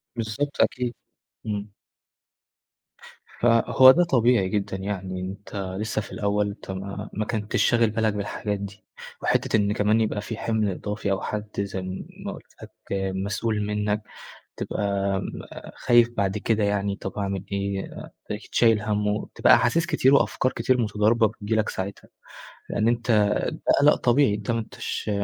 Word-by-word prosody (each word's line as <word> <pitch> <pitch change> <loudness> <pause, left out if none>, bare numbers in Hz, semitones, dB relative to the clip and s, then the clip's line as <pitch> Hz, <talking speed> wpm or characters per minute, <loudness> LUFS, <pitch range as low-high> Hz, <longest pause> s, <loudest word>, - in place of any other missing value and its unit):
بالضبط 115 +6 -2
أكيد، 125 -2 0 0.5
إمم. 105 -1 -4 1.7
فهو 120 +2 +7
ده 175 +5 +4
طبيعي 120 - +3
جدًا 100 -2 -2
يعني، 95 -1 -4
أنت 100 +3 -7 0.2
لسه 110 0 -1
في - - -11
الأول، 105 -1 0
أنت 100 -1 -8 0.4
ما 110 - -2
كنتش 105 -2 0
شاغل 115 -2 +3
بالك 110 -1 0
بالحاجات 105 0 -3
دي، 100 0 -8 0.4
وحتة - - +2
إن 105 0 +1
كمان 105 +1 +2
يبقى 105 -1 -1
في 110 +1 -6
حمل 110 -3 0
إضافي 105 +2 -3
أو 95 - 0
حد 105 0 -4
زي 95 -1 -2 0.4
ما - - -2
قُلت - - -14
لك - - -11 0.4
مسؤول 105 +3 -1
منك، 105 0 -1 0.6
تبقى 100 -1 -1 0.6
خايف 120 -1 +4
بعد 100 0 0
كده 110 0 +1
يعني 100 -1 0
طب 95 - -6
أعمل 100 -1 -2
إيه 100 0 -1 0.4
تلاقيك 105 +1 -6
شايل 115 -3 +4
هَمّه، 105 -1 0
وتبقى 105 - +3
احاسيس 170 +1 +2
كتير 135 -7 +3
وأفكار 130 -2 +2
كتير 130 -1 +1
متضاربة 110 +1 +3
بتيجي 110 0 -4
لك 110 -1 +1
ساعتها، 95 +1 -5 0.6
لأن 110 +2 +1
أنت 120 0 0 0.4
ده - - -9 0.2
قلق 145 +1 +6
طبيعي، 125 -3 +3
أنت 105 +2 -4
ما 115 - +1
أنتش 110 -1 -4
105 Hz, 145 wpm, -25 LUFS, 100-115 Hz, 1.7 s, فهو